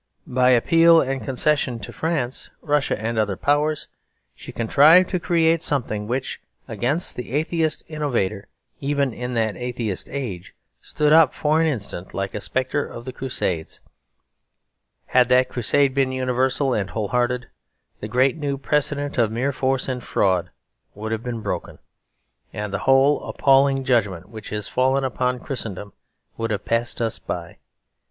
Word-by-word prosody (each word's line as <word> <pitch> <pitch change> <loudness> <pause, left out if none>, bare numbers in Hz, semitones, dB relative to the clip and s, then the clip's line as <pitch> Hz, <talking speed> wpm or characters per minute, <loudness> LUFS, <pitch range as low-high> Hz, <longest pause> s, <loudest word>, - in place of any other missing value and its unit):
By 125 0 +2
appeals 165 +7 +5
and 135 0 -2
concessions 130 -4 0
to - - -11
France, 150 -6 -2
Russia, 145 -6 0
and 110 +1 -2
other 100 -3 0
powers, 150 +1 +1 0.5
she - - -11
contrived 150 +10 +5
to 180 - 0
create 165 -2 +2
something 110 -9 -2
which, 125 +3 -3 0.3
against 145 +8 -1
the 125 -1 -7
atheist 160 +1 0
innovator 120 - -2 0.3
even 140 -2 0
in 125 +1 -5
that 110 -2 0
atheist 120 -5 -4
age, 115 -11 -5 0.3
stood 150 0 +1
up 160 -4 +6
for 155 +2 +2
an 165 - +3
instant 100 - -4
like 100 0 -3
a 105 - -4
spectre 130 +6 -1
of 120 - -9
the 130 - -6
Crusades. 95 -11 -3 1.3
Had 125 -1 +3
that 125 0 +4
Crusade 130 +3 +1
been 135 -1 +1
universal 130 +1 0
and 100 -3 -1
whole 105 -3 -3
hearted, 125 0 0 0.5
the 105 - -5
great 125 +4 +2
new 140 -3 -2
precedent 145 0 -1
of 110 -2 +2
mere 125 +5 0
force 130 -1 0
and 125 -2 -3
fraud 90 -3 +1 0.5
would 110 +2 -5
have 110 0 -2
been 115 -2 -5
broken; - - -4 0.7
and 105 -1 -5
the 100 - -1
whole 135 +2 +5
appalling 135 0 +3
judgment 105 -8 0
which 110 -1 -9
is 105 -1 -3
fallen 130 +2 +1
upon 125 -1 -1
Christendom 105 -7 -6 0.4
would 115 0 -2
have 105 -1 -3
passed 115 +1 -1
us 115 -2 -1
by. - - -6
130 Hz, 155 wpm, -22 LUFS, 110-140 Hz, 1.3 s, up